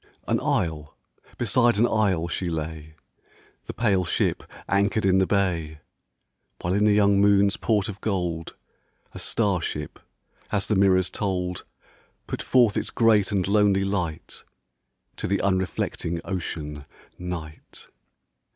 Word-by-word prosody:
An - - +1
isle 75 -3 -2 0.4
beside 120 -1 +2
an 115 - +4
isle 95 -7 +1
she 90 +1 -3
lay, 80 -1 -5 0.7
The - - -6
pale 100 -6 +2
ship 80 - 0 0.3
anchored 100 +2 +1
in 95 0 +4
the 95 - +2
bay, 85 -6 0 0.8
While 90 - -1
in 105 +2 +2
the 105 - +5
young 100 -1 +4
moon's 100 0 +4
port 105 -4 0
of 105 -1 -7
gold 90 -6 -2 0.6
A - - -8
star 100 -6 0
ship 75 -2 -5 0.3
— - - -33
as 100 -2 0
the 110 - 0
mirrors 95 -2 +3
told 90 -3 -3 0.3
— - - -36
Put - - -4
forth 120 -5 +3
its - - -1
great 110 -3 +3
and 95 -3 0
lonely 100 -1 +3
light 90 -6 -4 0.7
To - - -3
the 100 - 0
unreflecting 95 -3 -1
Ocean, 75 -6 -5 0.3
Night. 85 -3 -8
95 Hz, 140 wpm, -25 LUFS, 85-100 Hz, 0.8 s, the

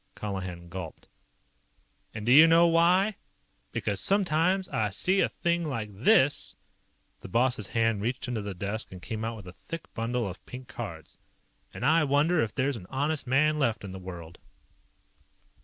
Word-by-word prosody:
Colihan 95 -4 -5
gulped. 85 -2 -8 1.0
"And 110 -1 -7
do 120 - +2
you 155 +5 +9
know 165 +1 +6
why? 180 +5 +3 0.5
Because 100 -2 -2
sometimes 185 - +2
I 110 -1 0
see 185 - +1
a - - +2
thing 170 0 -1
like 115 -9 -4
this 130 +7 +3 0.3
" - - -42
the - - -8
boss's 120 -3 +1
hand 115 -3 +1
reached 125 +5 -2
into 120 -3 -2
the 100 -2 -6
desk 100 +5 -4
and 95 - -9
came 110 +4 -5
out 115 +1 -3
with 105 -4 -11
a 90 - -9
thick 165 - -9
bundle 115 0 -2
of 95 -1 -8
pink 125 0 -9
cards 100 - -8 0.5
"and 125 - -5
I 160 +2 +4
wonder 150 +4 +2
if 110 - -2
there's 135 -1 0
an 90 -4 -11
honest 145 +1 -1
man 150 +4 +3
left 115 -7 0
in 100 - -7
the 95 - -7
world." 85 -2 -9
120 Hz, 175 wpm, -28 LUFS, 100-155 Hz, 1.0 s, you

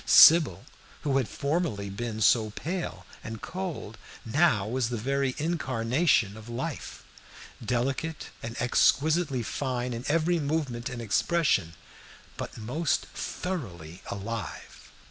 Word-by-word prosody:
Sybil, 160 - +7 0.4
who 135 -2 +1
had 130 -4 +1
formerly 140 - -1
been 110 +2 -4
so 110 0 +4
pale 155 - -4 0.2
and 110 0 -6
cold, 165 - -5 0.3
now 115 - +3
was 120 0 0
the 120 - -2
very 135 +3 0
incarnation 130 - +1
of 110 +1 -11
life; 130 +6 -5 0.6
delicate 135 +6 -2
and 115 +1 -6
exquisitely 140 +2 +3
fine 125 0 -2
in 115 +1 -5
every 165 +3 +2
movement 140 -5 -1
and 125 -2 -5
expression, 105 - +2 0.6
but - - -6
most 130 +9 0
thoroughly 90 - -5
alive. 105 +3 -6
125 Hz, 115 wpm, -28 LUFS, 110-155 Hz, 0.6 s, Sybil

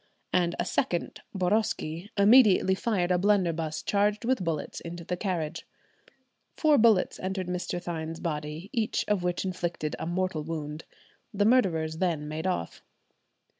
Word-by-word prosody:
and 175 -1 +2
a - - 0
second, 175 - -1
Boroski, 185 -2 -1
immediately 200 -3 +6
fired 190 -3 0
a 180 - +3
blunderbuss 170 -6 +1
charged 205 +2 +1
with 255 -5 +1
bullets 160 -4 -3
into 170 0 -7
the 180 - -2
carriage. 175 -4 -3 0.9
Four 305 -3 +4
bullets 220 -4 +3
entered 190 0 -3
Mr. 180 0 -3
Thynne's 165 -2 -5
body, 155 +3 -4
each 225 -4 0
of 210 -3 +1
which 180 +1 -1
inflicted 175 -4 -3
a - - -4
mortal 175 -2 -1
wound. 155 -1 -5 0.5
The 205 0 +2
murderers 165 -10 +2
then 165 -5 0
made 155 +4 -3
off. 85 - -3
180 Hz, 140 wpm, -28 LUFS, 160-200 Hz, 0.9 s, immediately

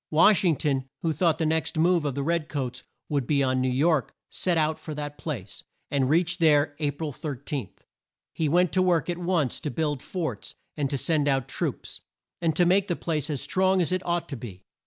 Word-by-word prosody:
Wash 180 +6 +5
ing 170 -4 +3
ton, 135 -3 -1
who 165 -1 +1
thought 165 +1 +2
the 160 - 0
next 160 0 0
move 170 0 +3
of 140 -3 -1
the 140 - -1
red 165 0 0
coats 130 -4 -3 0.3
would 140 -5 -1
be 140 -2 +2
on 130 -1 +1
New 130 - +1
York, 140 0 +1 0.2
set 180 -2 0
out 155 0 +1
for 155 - -7
that 145 0 -5
place, 115 - -6 0.3
and 135 -2 +1
reached 175 +3 +2
there 145 -3 +4
A 150 -2 +1
pril 145 +1 -4
13. 140 - -4 0.6
He 155 -2 0
went 180 +2 +3
to 185 - +2
work 175 -2 +2
at 175 - -5
once 170 -7 0
to 150 - -3
build 150 -4 -1
forts, 175 -4 -4 0.2
and 145 -3 -1
to 140 - -1
send 150 +1 +1
out 135 -3 +1
troops, - - -4 0.4
and 165 -3 +1
to 175 - +4
make 190 +3 +3
the 175 - 0
place 155 -3 -2
as 145 -4 -1
strong 190 0 +2
as 175 0 +1
it 185 0 0
ought 175 0 -1
to 140 - -4
be. 100 -7 -9
155 Hz, 220 wpm, -26 LUFS, 140-170 Hz, 0.6 s, Wash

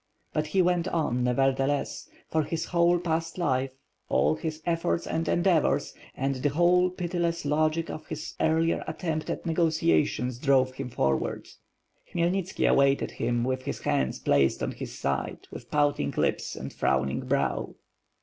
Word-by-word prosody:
But 155 0 0
he 185 +4 +2
went 175 0 +1
on, 150 -9 0
nevertheless; 135 +3 0 0.2
for 160 - +1
his 160 +2 -3
whole 175 0 +3
past 165 -1 -2
life, 135 -6 +1 0.4
all - - +3
his 155 0 -4
efforts 170 0 0
and 165 0 -2
endeavors; 175 -3 +2 0.2
and 135 +1 0
the 130 +3 +1
whole, 175 +4 +4
pitiless 175 -2 -2
logic 155 +2 +1
of 155 - -8
his 155 0 -6
earlier 165 +1 +2
attempt 160 -3 -3
at - - -4
negotiations 140 - +1
drove 130 -2 +3
him 130 -1 -5
forward. 70 - -1 0.6
Khmyelniski 175 +2 0
awaited 140 0 +3
him 120 -1 -1
with 130 +1 -1
his - - -4
hands 65 -1 0
placed 70 -1 +2
on - - -1
his - - -7
side, 70 0 -3
with - - -9
pouting 145 - +1
lips - - 0
and - - -7
frowning 65 0 0
brow. - - 0
155 Hz, 150 wpm, -27 LUFS, 130-170 Hz, 0.6 s, whole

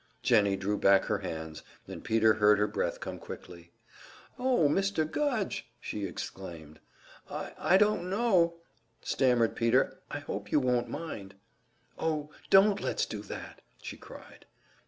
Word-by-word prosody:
Jennie 105 -6 +4
drew 100 +2 -2
back 100 0 +5
her 100 - 0
hands, 80 -4 -6 0.3
and - - -8
Peter 110 0 +4
heard 105 -1 +5
her 105 - +2
breath 105 - -2
come - - -6
quickly. 85 -1 -10 0.7
"Oh, 250 - +3
Mr. 195 +1 +1
Gudge!" 220 - -2
she 105 -4 -4
exclaimed. 85 -4 -8 0.5
"I - - -5
I 190 - +4
don't 205 -3 +2
know 190 -5 +3 0.3
" 115 0 -43
stammered 125 -4 +3
Peter. 120 +3 +2
"I - - -4
hope 105 -8 -6
you 150 - +4
won't 125 -2 +1
mind." 100 -12 -6 0.6
"Oh, 150 -2 -2 0.2
don't 200 +1 +6
let's - - 0
do - - -6
that!" - - -9 0.2
she - - -7
cried. - - -14
120 Hz, 145 wpm, -30 LUFS, -, 0.7 s, don't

